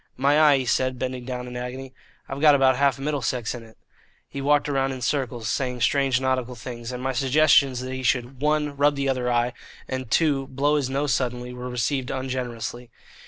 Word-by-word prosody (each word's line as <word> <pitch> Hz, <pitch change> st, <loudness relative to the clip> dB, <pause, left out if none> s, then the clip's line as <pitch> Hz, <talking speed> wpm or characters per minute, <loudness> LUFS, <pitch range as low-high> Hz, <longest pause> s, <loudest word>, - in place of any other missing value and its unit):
"My 140 Hz, +3 st, +3 dB
eye," 150 Hz, -3 st, +6 dB
he 130 Hz, -, -2 dB
said, 130 Hz, +1 st, 0 dB
bending 125 Hz, -1 st, -4 dB
down 125 Hz, -1 st, -4 dB
in 125 Hz, -, -8 dB
agony; 130 Hz, +2 st, -6 dB, 0.3 s
"I've 135 Hz, +1 st, -6 dB
got 150 Hz, -2 st, +7 dB
about 135 Hz, -1 st, +4 dB
half 140 Hz, 0 st, +2 dB
Middlesex 135 Hz, -4 st, -2 dB
in 120 Hz, -, -7 dB
it." 110 Hz, -1 st, -16 dB, 0.5 s
He 140 Hz, -, -6 dB
walked 145 Hz, +1 st, +2 dB
round 135 Hz, -2 st, 0 dB
in 130 Hz, -, -7 dB
circles 120 Hz, -3 st, -2 dB
saying 125 Hz, +3 st, -2 dB
strange 135 Hz, +1 st, +2 dB
nautical 130 Hz, -2 st, -1 dB
things, 120 Hz, +1 st, -7 dB
and 125 Hz, 0 st, -6 dB
my 130 Hz, 0 st, -1 dB
suggestions 135 Hz, -1 st, +3 dB
that 130 Hz, 0 st, -5 dB
he 130 Hz, -, -4 dB
should 130 Hz, 0 st, -1 dB
(1) 150 Hz, -1 st, 0 dB
rub 145 Hz, +1 st, +3 dB
the 140 Hz, 0 st, -1 dB
other 125 Hz, -2 st, 0 dB
eye 120 Hz, 0 st, +1 dB, 0.3 s
and 130 Hz, -2 st, -4 dB
(2) 140 Hz, -1 st, +2 dB
blow 140 Hz, +3 st, +1 dB
his 140 Hz, -3 st, 0 dB
nose 140 Hz, -1 st, 0 dB
suddenly 125 Hz, 0 st, -2 dB
were 125 Hz, 0 st, -6 dB
received 125 Hz, +2 st, -1 dB
ungenerously. 125 Hz, -2 st, -4 dB
130 Hz, 200 wpm, -24 LUFS, 125-140 Hz, 0.5 s, got